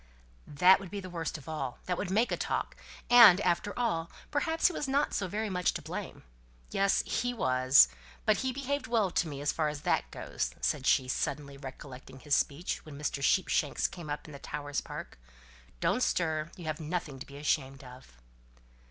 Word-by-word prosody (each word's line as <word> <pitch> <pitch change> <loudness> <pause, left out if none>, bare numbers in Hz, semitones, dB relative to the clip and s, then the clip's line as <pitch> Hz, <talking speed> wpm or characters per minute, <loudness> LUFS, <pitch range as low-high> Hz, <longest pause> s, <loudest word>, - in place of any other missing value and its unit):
"That 180 +6 +5
would 195 -2 -9
be 200 - -5
the 185 -2 -8
worst 165 -2 -3
of 150 - -14
all. 135 -6 -4
That 180 - -1
would 180 - -3
make 220 +6 +2
a - - +2
talk. - - -2 0.3
And, 230 -7 +9
after 180 +3 +1
all, 170 -9 -1 0.2
perhaps 320 +3 0
he 360 - +5
was 295 - -3
not 280 +2 +1
so 195 - -1
very 215 +4 -2
much 180 -3 0
to - - -3
blame. - - -6 0.5
Yes! 195 0 +2
he 245 +1 -1
was. 130 - +5 0.4
But - - +4
he 260 0 -1
behaved 280 +1 -3
well 220 -6 +1
to 170 - +1
me 140 -2 -6
as 145 - +1
far 155 -2 0
as 150 -1 -6
that - - 0
goes," - - -4
said - - -1
she, 130 - +4
suddenly 140 +2 -2
recollecting 135 -1 -10
his 145 +2 +1
speech 155 +5 -1
when 150 -2 -10
Mr. 145 -1 -3
Sheepshanks 150 -2 +1
came 175 -5 -4
up 145 - -4
in - - -10
the 140 - -9
Towers' 145 0 -4
Park - - -8 0.6
"Don't 250 - +1
stir, 160 -7 0
you 175 - -9
have 155 -1 -2
done 155 -1 -7
nothing 160 -6 -3
to - - -9
be 140 - -11
ashamed 135 -2 -1
of." 125 - -13
160 Hz, 200 wpm, -30 LUFS, 140-200 Hz, 0.6 s, And